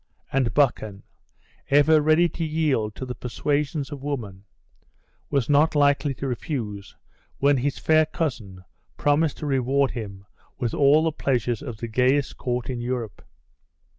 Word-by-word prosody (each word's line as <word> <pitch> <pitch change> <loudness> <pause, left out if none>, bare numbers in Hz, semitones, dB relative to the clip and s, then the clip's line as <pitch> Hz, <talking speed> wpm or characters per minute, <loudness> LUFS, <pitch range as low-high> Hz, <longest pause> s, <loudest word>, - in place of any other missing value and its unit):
And 130 -3 +1
Buchan, 110 -8 +1 0.7
ever 150 +2 +5
ready 155 +3 +4
to 165 - -5
yield 150 -9 0
to 130 - -6
the 125 - -5
persuasions 145 +4 -2
of 145 -2 -7
woman, 110 -9 -5 0.8
was 140 -4 0
not 150 +2 +3
likely 145 -1 +2
to 135 - -4
refuse, 115 -6 -5 0.4
when 140 0 +3
his 135 +2 -1
fair 155 -1 +3
cousin 115 - -4 0.3
promised 145 +1 +1
to 155 - -6
reward 135 0 +1
him 100 -5 -7 0.3
with 120 -2 -2
all 145 +2 +4
the 160 - +1
pleasures 125 -6 -1
of 120 -7 -7
the 115 - -5
gayest 130 +5 +1
court 125 -1 -3
in 125 -2 -4
Europe. 120 -4 -4
135 Hz, 145 wpm, -24 LUFS, 120-145 Hz, 0.8 s, ever